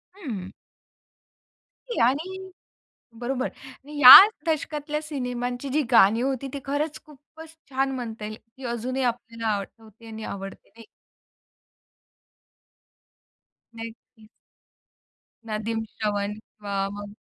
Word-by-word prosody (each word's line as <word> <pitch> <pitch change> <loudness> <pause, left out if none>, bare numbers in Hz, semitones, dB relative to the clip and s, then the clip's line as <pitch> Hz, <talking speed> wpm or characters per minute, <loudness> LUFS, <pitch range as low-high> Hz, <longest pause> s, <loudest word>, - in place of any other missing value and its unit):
हं. 220 - -6 1.6
आणि 330 +9 -1 0.8
बरोबर. 255 +1 -2 0.2
आणि 285 +3 -11
या 255 -1 +14 0.3
दशकातल्या 300 -1 -2
सिनेमांची 250 -3 -4
जी 295 +3 +1
गाणी 225 0 +5
होती 270 0 -2
ती 280 - -5
खरंच 290 +2 -2
खूपच 315 +2 -15
छान 270 +1 0
म्हणता 225 -4 -6
येईल. 215 0 -6
ती 230 +4 -17
अजूनही 250 +3 -3
आपल्याला 230 -2 -3
आठवते 220 +2 -11
आणि 220 -1 -8
आवडते 195 0 -8
नाही 230 0 -16 2.9
नक्कीच. 225 -1 -11 1.2
"नदीम 225 +1 -3
श्रवण" 205 -1 -3
किंवा 200 -2 -5
मग 205 0 -8
240 Hz, 95 wpm, -25 LUFS, 220-275 Hz, 2.9 s, या